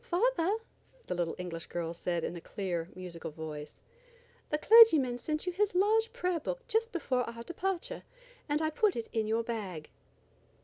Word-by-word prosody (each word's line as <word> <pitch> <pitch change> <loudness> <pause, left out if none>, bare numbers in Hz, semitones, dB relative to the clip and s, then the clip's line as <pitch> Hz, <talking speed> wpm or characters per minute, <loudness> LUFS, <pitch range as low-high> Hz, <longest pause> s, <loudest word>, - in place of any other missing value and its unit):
"Father," 410 -2 +1 0.5
the - - -2
little 175 -2 -1
English 170 -2 -6
girl 170 -1 -3
said 170 0 -2
in 175 - -3
a 170 - -7
clear, 175 -4 -3
musical 180 -3 -7
voice, 150 -1 -7 0.7
"the 300 - +1
clergyman 310 - +7
sent 305 +5 -2
you 360 - 0
his 400 0 +1
large 435 +4 +3
prayer 360 -2 -1
book - - -5
just 455 -1 +1
before 270 -7 0
our 230 0 -8
departure, 385 - -3 0.5
and 300 +2 +1
I 315 - +1
put 415 +5 +2
it 230 - -4
in 220 -2 0
your 225 +1 +1
bag." 195 -9 -5
265 Hz, 170 wpm, -31 LUFS, -, 0.7 s, clergyman